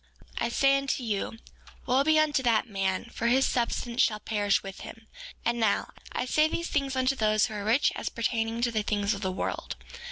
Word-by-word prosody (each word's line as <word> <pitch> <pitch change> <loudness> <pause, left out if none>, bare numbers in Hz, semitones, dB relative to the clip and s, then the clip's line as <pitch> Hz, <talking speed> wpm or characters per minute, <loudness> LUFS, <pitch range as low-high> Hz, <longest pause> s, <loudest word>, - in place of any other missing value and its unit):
4:23 - - 0
I - - -1
say 275 +3 +3
unto 275 -1 -2
you, 220 0 -2 0.5
wo 260 +2 +3
be 315 +1 +4
unto 305 -3 +3
that 235 -1 +2
man, 195 -3 -1
for 235 - -1
his 260 +3 +4
substance 240 0 0
shall 215 -4 +2
perish 205 -2 0
with 195 -1 -8
him; 225 0 -10 0.4
and 235 0 +1
now, 220 -3 +1 0.2
I - - -2
say 305 +4 +3
these 335 +1 -3
things 275 -2 -1
unto 260 +1 +1
those 215 -3 +3
who 220 - -6
are 205 -1 -4
rich 230 +7 +3
as - - -3
pertaining 230 0 -1
to 240 - +2
the 220 -2 0
things 205 -1 0
of 200 - -6
this 190 - -1
world. 185 - -4
235 Hz, 215 wpm, -28 LUFS, 215-265 Hz, 0.5 s, be